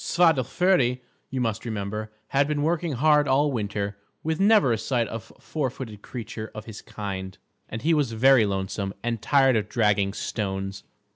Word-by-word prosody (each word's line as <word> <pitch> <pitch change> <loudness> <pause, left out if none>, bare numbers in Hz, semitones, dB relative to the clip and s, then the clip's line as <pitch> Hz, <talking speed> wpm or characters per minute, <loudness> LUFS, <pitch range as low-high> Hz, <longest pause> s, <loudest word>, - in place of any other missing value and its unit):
Svadilföri, 155 -4 +3 0.3
you 130 - -3
must 115 -3 -1
remember, 110 -1 -4 0.2
had 140 +1 +2
been 145 -1 -1
working 165 0 0
hard 150 +3 +4
all 140 +2 +3
winter, 100 -3 -3 0.2
with 160 0 -1
never 200 - +5
a - - 0
sight 120 -3 0
of 115 0 -7
four 150 -4 -2
footed 115 -5 -8
creature 110 -2 -7
of 110 0 -7
his 110 -3 -9
kind, 95 -2 -6 0.3
and 115 - -6
he 165 +2 +3
was 145 -7 +1
very 125 -1 +5
lonesome 95 0 -3
and 115 -2 -2
tired 135 -1 +4
of 105 -1 0
dragging 105 -3 +2
stones. 95 -2 -3
115 Hz, 165 wpm, -25 LUFS, 105-140 Hz, 0.3 s, never